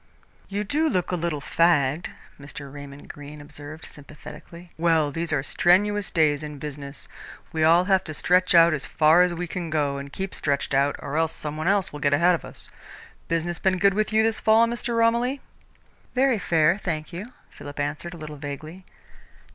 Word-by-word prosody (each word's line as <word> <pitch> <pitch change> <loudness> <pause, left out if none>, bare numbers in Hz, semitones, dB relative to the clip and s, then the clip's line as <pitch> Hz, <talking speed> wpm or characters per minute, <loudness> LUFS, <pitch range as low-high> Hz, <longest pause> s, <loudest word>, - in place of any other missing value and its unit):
"You 200 +1 -2
do 305 +9 +1
look 180 - -1
a - - +1
little 165 -4 -2
fagged," 155 0 +2 0.3
Mr. 140 -1 -9
Raymond 145 0 -10
Greene 145 +1 -10
observed 145 +1 -10
sympathetically. 170 +4 -12
"Well, 160 -3 +2
these 165 +2 -3
are 140 -3 0
strenuous 205 +6 +2
days 150 -3 +2
in 150 -1 -7
business. 140 -1 -7 0.5
We 160 -1 0
all 165 +3 +6
have 190 0 +2
to 155 - -6
stretch 180 +2 +2
out 170 -1 +7
as 145 -4 -3
far 160 +2 +5
as 180 0 +3
we 180 +1 -3
can 175 -1 -5
go, 145 -3 0
and 140 0 -8
keep 190 +4 -5
stretched 140 -1 -1
out, 140 +1 +2
or 145 +2 -5
else 160 0 +1
some 150 0 -4
one 155 +2 -3
else 200 -4 +1
will 150 - -6
get 145 0 +3
ahead 175 +4 +4
of 170 - -2
us. - - -8 0.6
Business 165 +1 -1
been 190 -1 +1
good 195 +1 +4
with 215 +2 0
you 220 0 +3
this 225 -1 0
fall, 220 +1 +5
Mr. 235 0 -2
Romilly?" 235 +4 +2 0.8
"Very 255 -3 +3
fair, 170 +1 +2
thank 155 -3 -4
you," 205 +9 -7 0.2
Philip 145 0 -10
answered 150 +5 -3
a - - -10
little 155 -2 -8
vaguely. 155 +6 -8
165 Hz, 190 wpm, -24 LUFS, 145-185 Hz, 0.8 s, out